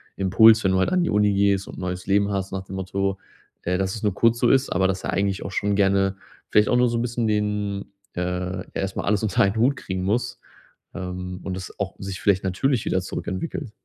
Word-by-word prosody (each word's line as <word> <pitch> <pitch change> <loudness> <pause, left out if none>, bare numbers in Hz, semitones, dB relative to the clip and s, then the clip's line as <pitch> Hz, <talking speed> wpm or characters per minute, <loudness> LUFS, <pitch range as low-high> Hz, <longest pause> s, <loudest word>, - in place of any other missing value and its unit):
Impuls, 110 +4 +5
wenn 95 - +3
du 95 - +2
heut 95 - +2
an 185 -1 +2
die - - 0
Uni 105 -1 +3
gehst 100 -1 +2
und - - -10
neues 90 -1 -4
Leben 100 +1 +2
hast 95 -1 -2
nach 95 -1 -3
dem 95 - -9
Motto, 95 +1 -2 0.4
äh, 90 +1 0
dass 95 0 -1
es 110 - -7
nur 105 -3 +1
kurz 115 +2 +3
so 120 - +3
ist, 135 0 +3
aber 95 +1 +2
dass 95 0 -2
er - - -2
eigentlich 100 0 -1
auch 85 - -6
schon 100 +1 0
gerne 95 -1 +2 0.3
vielleicht 105 0 +4
auch 125 - +3
nur 125 0 +4
so 115 - -1
'n - - 0
bisschen 120 -1 -1
den, 105 -1 -1 0.3
äh 90 +1 -3
erst 95 0 -3
mal - - -2
alles 105 +1 +1
unter 105 -4 +1
einen 100 +1 +1
Hut 125 +5 +3
kriegen 95 -6 -4
muss, 120 +4 -1 0.6
ähm, 90 -1 -5
und 95 - -4
das 95 0 -8
auch 100 -1 -3
sich 95 -1 -5
vielleicht 100 -2 +2
natürlich 110 +6 0
wieder 95 - +1
zurückentwickelt. 105 - -5
100 Hz, 235 wpm, -23 LUFS, 95-105 Hz, 0.6 s, Impuls